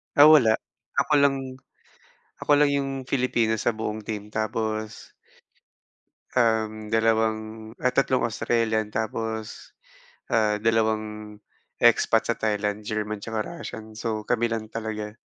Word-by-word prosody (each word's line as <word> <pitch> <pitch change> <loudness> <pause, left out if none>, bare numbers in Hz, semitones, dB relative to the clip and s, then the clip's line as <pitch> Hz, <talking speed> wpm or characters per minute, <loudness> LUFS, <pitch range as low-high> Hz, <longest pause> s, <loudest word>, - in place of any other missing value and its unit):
Ah, 145 +1 +9
wala. 130 -8 +6 0.4
Ako 155 - +1
lang 135 -2 0 0.8
ako - - -1
lang 145 0 +4
yung 140 -1 0
Filipino 120 -4 0
sa 120 +1 0
buong 110 0 -3
team 105 -1 -5
tapos, 110 0 -3 1.2
um, 110 -3 +1
2, 110 0 0
ah, 125 - +3
3 130 0 +2
Australian, 115 -1 0
tapos, 110 0 -4 0.5
ah, 105 -2 +2
2 110 -1 -1 0.4
expats - - +4
sa - - +1
Thailand, 105 -1 -1
German 110 0 -2
tsaka 110 +2 -4
Russian, 110 -10 -8
so 110 -1 -4
kami 120 -1 +1
lang 110 -1 -3
talaga. 110 -1 -5
110 Hz, 120 wpm, -25 LUFS, 110-115 Hz, 1.2 s, Ah